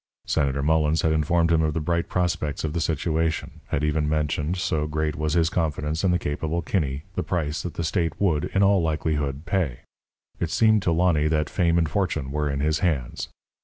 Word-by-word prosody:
Senator 70 -2 0
Mullens 80 +1 +2
had 80 - +3
informed 85 +2 +2
him 80 -1 +4
of 80 -1 0
the - - +1
bright 85 +2 -1
prospects 85 -5 -1
of 75 -2 -2
the 85 - -1
situation; 80 +1 -1
had 70 - -1
even 75 0 +1
mentioned 75 +2 0
so 80 -4 0
great 75 0 -1
was 75 +1 -1
his 85 -2 +3
confidence 80 -1 -1
in 95 - +3
the 90 - +3
capable 80 +2 -2
Kinney 75 -6 -1
the 90 - -1
price 80 -3 -2
that 90 - -6
the 85 - -2
state 85 -1 -1
would, 80 -7 +2
in 100 - +1
all 100 -1 +4
likelihood, 75 -2 -1
pay. 85 -9 -1 0.6
It - - -1
seemed 110 -1 +4
to 85 - +1
Lonny 80 -3 +3
that 75 -1 0
fame 85 -2 +2
and 80 -2 +2
fortune 80 -5 -1
were 75 0 -1
in 70 0 -2
his 75 +1 +1
hands. 75 -10 -1
80 Hz, 200 wpm, -25 LUFS, 75-85 Hz, 0.6 s, him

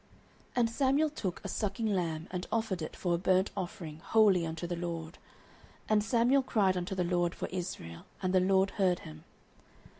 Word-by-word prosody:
09:007:009 - - -32 0.5
And 240 -2 +3
Samuel 275 +5 +2
took 190 - -4
a - - -4
sucking 210 +1 -2
lamb, 170 -6 -1
and 180 0 -4
offered 220 -6 -1
it 155 - -5
for 175 -2 -1
a - - +2
burnt 185 +1 +2
offering 170 -5 -5
wholly 195 -3 +4
unto 160 +1 -4
the 175 0 -2
LORD: 170 -1 -5 0.7
and 215 -1 +3
Samuel 240 +5 +3
cried 200 -7 +2
unto 180 +1 -3
the 180 - +1
LORD 175 0 0
for - - -4
Israel; 175 - -6
and 185 -1 -1
the 185 - +6
LORD 190 +1 +3
heard 185 -3 +1
him. 75 0 -11
185 Hz, 185 wpm, -31 LUFS, 175-210 Hz, 0.7 s, the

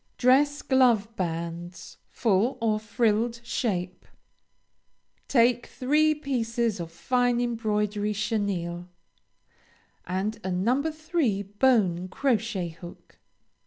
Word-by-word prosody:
DRESS 285 +3 +3
GLOVE 235 -5 +3
BANDS; 170 -1 -5
FULL 225 +3 +1
OR 220 -2 +1
FRILLED 230 +1 0
SHAPE. 185 -7 -3 1.2
Take 240 -1 +3
three 305 +4 +2
pieces 235 -6 -1
of 165 -1 -6
fine 245 +6 +1
embroidery 210 -3 -1
chenille, 185 -5 -2 1.2
and 190 +5 -2
a 190 - -3
No. 215 +9 +1
3 310 - -1
bone 200 -4 +2
crochet 220 -5 -1
hook. 170 +2 -13
220 Hz, 90 wpm, -26 LUFS, 185-245 Hz, 1.2 s, DRESS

